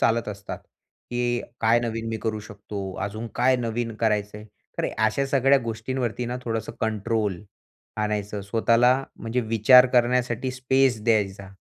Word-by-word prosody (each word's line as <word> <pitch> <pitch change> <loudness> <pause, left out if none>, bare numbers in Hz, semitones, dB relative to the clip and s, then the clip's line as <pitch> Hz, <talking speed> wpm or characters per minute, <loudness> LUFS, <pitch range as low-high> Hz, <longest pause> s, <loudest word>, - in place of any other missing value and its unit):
चालत 115 -1 +2
असतात, 100 -1 -6 0.5
की 120 0 0 0.2
काय 115 +1 +4
नवीन 115 -1 -3
मी 115 - -2
करू 110 -2 -2
शकतो? 100 -2 -7
अजून 110 +3 -5
काय 130 +1 +3
नवीन 115 -1 -3
करायचं 105 -2 0
आहे. 105 - -12 0.3
तर - - +1 0.2
अशा 135 +6 0
सगळ्या 135 0 +4
गोष्टींवरती 120 +1 -3
ना 120 +1 -3
थोडंसं 115 -2 -3
कंट्रोल 110 -3 -1 0.5
आणायचं. 105 -1 -2
स्वतःला, 115 +5 +3
म्हणजे 115 +2 -2
विचार 115 +3 +6
करण्यासाठी 125 +1 +2
स्पेस 130 -2 +2
द्यायचा. 100 -4 +1
115 Hz, 140 wpm, -25 LUFS, 105-125 Hz, 0.5 s, विचार